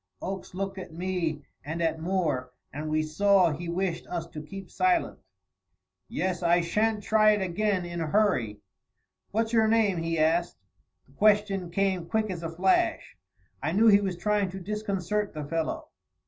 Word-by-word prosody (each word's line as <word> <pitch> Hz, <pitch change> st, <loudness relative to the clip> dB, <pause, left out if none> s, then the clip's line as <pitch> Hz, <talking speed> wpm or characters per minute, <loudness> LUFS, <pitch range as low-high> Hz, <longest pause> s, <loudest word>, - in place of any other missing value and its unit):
Oakes 190 Hz, -1 st, -6 dB
looked 195 Hz, 0 st, -3 dB
at 185 Hz, -, -8 dB
me 165 Hz, -3 st, -2 dB, 0.2 s
and 160 Hz, +4 st, -4 dB
at 160 Hz, -1 st, 0 dB
Moore, 160 Hz, -8 st, -1 dB, 0.2 s
and 155 Hz, +2 st, -4 dB
we 155 Hz, 0 st, +1 dB
saw 185 Hz, +3 st, +3 dB
he 170 Hz, +3 st, -5 dB
wished 170 Hz, -1 st, -2 dB
us 170 Hz, -2 st, -3 dB
to 150 Hz, -, -7 dB
keep 190 Hz, +5 st, -9 dB
silent. 360 Hz, -2 st, +1 dB, 0.9 s
"Yes! 185 Hz, -1 st, -2 dB
I 175 Hz, 0 st, +4 dB
shan't 210 Hz, +5 st, 0 dB
try 215 Hz, 0 st, +5 dB
it 205 Hz, -, -1 dB
again 190 Hz, 0 st, 0 dB
in 175 Hz, -1 st, -5 dB
a 160 Hz, -, -1 dB
hurry. 145 Hz, -, +1 dB, 0.7 s
What's 225 Hz, +2 st, -1 dB
your 220 Hz, -1 st, +4 dB
name?" 220 Hz, -4 st, +3 dB
he 165 Hz, 0 st, -1 dB
asked. 165 Hz, +3 st, +1 dB, 0.5 s
The 135 Hz, -, -24 dB
question 200 Hz, -1 st, +2 dB
came 190 Hz, -1 st, 0 dB
quick 215 Hz, -2 st, 0 dB
as 175 Hz, -2 st, -5 dB
a 165 Hz, -, -4 dB
flash. 180 Hz, +3 st, +1 dB, 0.5 s
I 155 Hz, +4 st, -1 dB
knew 220 Hz, +4 st, +5 dB
he 200 Hz, -1 st, +6 dB
was 190 Hz, -3 st, -2 dB
trying 205 Hz, +1 st, +1 dB
to 190 Hz, +1 st, -7 dB
disconcert 205 Hz, 0 st, -2 dB
the 150 Hz, -1 st, -4 dB
fellow. 165 Hz, +1 st, -3 dB
185 Hz, 170 wpm, -27 LUFS, 165-205 Hz, 0.9 s, he